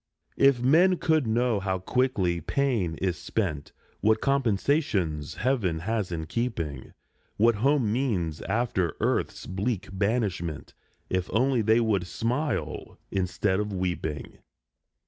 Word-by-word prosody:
" - - -41
If 125 -3 -1
men 175 +8 +5
could 160 -7 +2
know 115 -1 +2
how 95 -1 -1
quickly 95 -4 0
pain 115 - 0
is 90 +1 -2
spent, 80 -10 -2 0.3
What 110 +1 +3
compensations 110 - 0
heaven 105 -10 0
has 105 -1 -2
in 80 -2 -3
keeping, 85 - -3 0.4
What 115 +1 +4
home 135 -5 +3
means 95 - -1
after 110 -8 0
earth's - - -1
bleak 100 +1 -2
banishment, 100 -6 -1 0.4
If 95 -1 -1
only 125 +3 +2
they 110 +2 +4
would 105 -6 +1
smile 125 - -2
instead 95 +1 0
of 105 0 -2
weeping." 90 -6 -3
105 Hz, 125 wpm, -27 LUFS, 90-125 Hz, 0.4 s, men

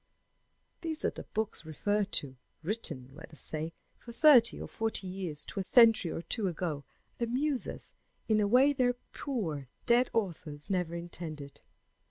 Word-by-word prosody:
These 320 -2 -3
other - - -3
books 220 -4 0
referred 205 +6 -1
to, 135 -2 0 0.3
written, 155 - -1
let 155 +3 -12
us 155 - -7
say, 155 +1 -3 0.3
from 235 - -11
thirty 250 -6 +7
or - - -6
forty 225 -3 -1
years 180 -5 -3
to 200 - -3
a - - -1
century 225 -4 +6
or 165 - -4
two 215 0 0
ago, 160 -5 -3 0.3
amuse 255 +4 0
us - - -4 0.3
in 215 -1 +3
a 205 - +2
way 260 +6 +5
their 250 -2 +2 0.2
poor 165 - -3 0.2
dead 240 +1 +4
authors 170 -6 -3
never 180 -3 -1
intended. 160 -4 -7
195 Hz, 155 wpm, -31 LUFS, 160-235 Hz, 0.3 s, thirty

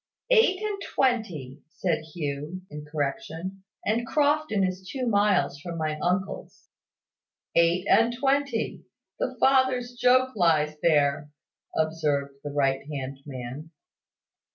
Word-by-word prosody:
"Eight 445 -6 +5
and 415 -2 -2
twenty," 180 - 0
said 180 +1 -1 0.2
Hugh, 150 +3 -4
in 150 0 -7
correction; 160 +6 -3 0.2
"and 230 +3 0
Crofton 295 -8 +2
is 185 0 -3
two 260 -2 -2
miles 205 -8 +2
from 170 +2 -6
my 155 -1 -2
uncle's." 185 +2 -2 0.8
"Eight 170 +2 +3
and 230 +1 +5
twenty. 270 -1 0 0.4
The - - -2
father's 260 -2 +3
joke 255 +1 +3
lies 155 -5 +3
there," 145 -2 +2 0.5
observed 150 -3 0
the 145 - -4
right 135 -2 +1
hand 135 -1 -5
man. 130 +3 -7
180 Hz, 115 wpm, -26 LUFS, 150-245 Hz, 0.8 s, Eight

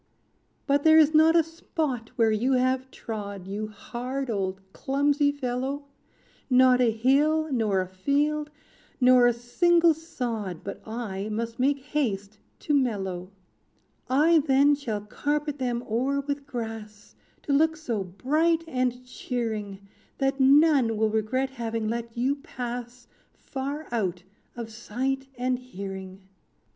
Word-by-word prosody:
"But 285 0 +2
there 315 0 +7
is 315 0 +6
not 315 +2 +6
a 335 - +6
spot 310 -7 -4
where 225 -2 +3
you 240 +5 +1
have 255 +1 +1
trod. 200 -6 -6
You 205 +3 -4
hard, 250 +4 -5
old 190 -2 -2
clumsy 285 +1 +1
fellow, 270 +1 -3 0.6
Not 255 -1 +5
a 240 - +4
hill, 285 +8 +2
nor 215 -7 +1
a 185 - -4
field, 290 +10 0 0.5
nor 250 -1 +6
a - - +5
single 335 +8 +3
sod, 235 - -5
But 200 - -7
I 215 -3 -4
must 230 +2 -4
make 275 +2 +2
haste 215 -8 -2 0.2
to 300 - -1
mellow. 195 -9 -1 0.8
"I 310 +5 +5
then 280 0 +4
shall 240 -8 -3
carpet 290 +6 -2
them 245 -2 -1
o'er 260 +5 0
with 280 0 -4
grass, 225 -5 -7 0.3
To 285 - -1
look 315 +2 +3
so 235 -10 -2
bright 310 - +1
and 250 -3 -1
cheering, 215 -6 -4 0.3
That 270 0 0
none 270 -4 +5
will 220 0 +2
regret 255 +5 0
having 230 -3 -3
let 235 0 -4
you 265 +4 +1
pass 245 -4 -7 0.3
Far 280 +3 -5
out 185 -6 -1 0.3
of 230 -2 -6
sight 260 +4 -3
and 250 0 0
hearing. 195 -5 -8
250 Hz, 135 wpm, -26 LUFS, 220-285 Hz, 0.8 s, there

